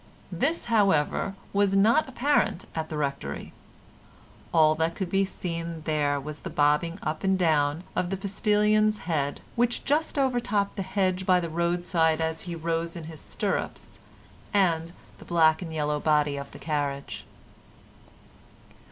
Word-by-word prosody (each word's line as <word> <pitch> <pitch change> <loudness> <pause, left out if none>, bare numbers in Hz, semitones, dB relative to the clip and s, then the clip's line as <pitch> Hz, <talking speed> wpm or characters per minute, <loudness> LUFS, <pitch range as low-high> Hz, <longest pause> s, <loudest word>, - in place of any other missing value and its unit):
This, 335 +1 0
however, 195 -4 +2 0.2
was 200 -1 +2
not 230 +9 +4
apparent 260 - +1
at 160 -1 -3
the 155 - -4
Rectory. 140 -2 -4 1.0
All 155 -2 +5
that 160 +1 -1
could 185 -3 -4
be 195 0 +3
seen 170 -3 -4
there 145 -2 0
was 150 +2 -6
the - - -7
bobbing 150 +4 +2
up 155 0 -3
and 190 0 +2
down 155 -2 +2
of 175 - 0
the 195 - -2
postilion's 210 +2 +2
head, 145 -4 -1
which 240 0 0
just 300 +2 0
over 260 -3 +2
topped 210 -5 -1
the - - -3
hedge 190 -1 -1
by 185 -1 +5
the 170 -1 -3
roadside 170 -1 +1
as 160 0 -1
he 170 - -3
rose 165 0 -2
in 170 - -6
his 155 -1 -9
stirrups, - - -3 0.6
and 170 -4 +2 0.3
the - - -12
black 160 -1 +3
and 170 -3 -6
yellow 150 -1 -1
body 150 -1 +2
of 140 0 -6
the - - -12
carriage. 145 -3 -3
170 Hz, 150 wpm, -27 LUFS, 155-195 Hz, 1.0 s, All